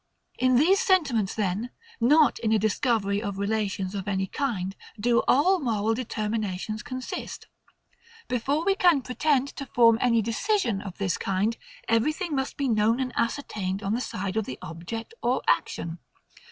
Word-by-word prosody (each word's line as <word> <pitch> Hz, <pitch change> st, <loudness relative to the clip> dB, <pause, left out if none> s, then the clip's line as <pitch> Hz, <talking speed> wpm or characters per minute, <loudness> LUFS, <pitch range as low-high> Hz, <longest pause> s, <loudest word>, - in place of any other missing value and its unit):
In 255 Hz, 0 st, +3 dB
these 345 Hz, +10 st, +5 dB
sentiments 290 Hz, -, +2 dB
then, 210 Hz, +3 st, -1 dB, 0.3 s
not 295 Hz, +6 st, +4 dB
in 220 Hz, -, 0 dB
a 220 Hz, -, +5 dB
discovery 210 Hz, -1 st, +1 dB
of 200 Hz, -3 st, -4 dB
relations 200 Hz, -2 st, -1 dB
of 195 Hz, -1 st, -5 dB
any 190 Hz, -1 st, 0 dB
kind, 195 Hz, -5 st, -3 dB, 0.2 s
do 235 Hz, +2 st, +3 dB
all 360 Hz, +8 st, +4 dB
moral 225 Hz, -5 st, 0 dB
determinations 215 Hz, -3 st, -3 dB
consist. 255 Hz, -2 st, -6 dB, 0.8 s
Before 275 Hz, +6 st, 0 dB
we 395 Hz, -, +4 dB
can 350 Hz, -8 st, +3 dB
pretend 275 Hz, +1 st, +1 dB
to 275 Hz, -, -8 dB
form 230 Hz, -2 st, +4 dB
any 230 Hz, -3 st, +3 dB
decision 230 Hz, -, 0 dB
of 195 Hz, -3 st, -8 dB
this 195 Hz, -3 st, -1 dB
kind, 195 Hz, +4 st, 0 dB, 0.3 s
everything 305 Hz, -, +1 dB
must 265 Hz, 0 st, -2 dB
be 280 Hz, -, 0 dB
known 225 Hz, +1 st, +2 dB
and 255 Hz, -2 st, -2 dB
ascertained 210 Hz, -5 st, -2 dB
on 200 Hz, +1 st, -1 dB
the 240 Hz, -, 0 dB
side 200 Hz, -4 st, -4 dB
of 220 Hz, -, 0 dB
the 130 Hz, -, -6 dB
object 175 Hz, -, -7 dB
or -, -, 0 dB
action. 165 Hz, 0 st, 0 dB
230 Hz, 155 wpm, -26 LUFS, 200-265 Hz, 0.8 s, these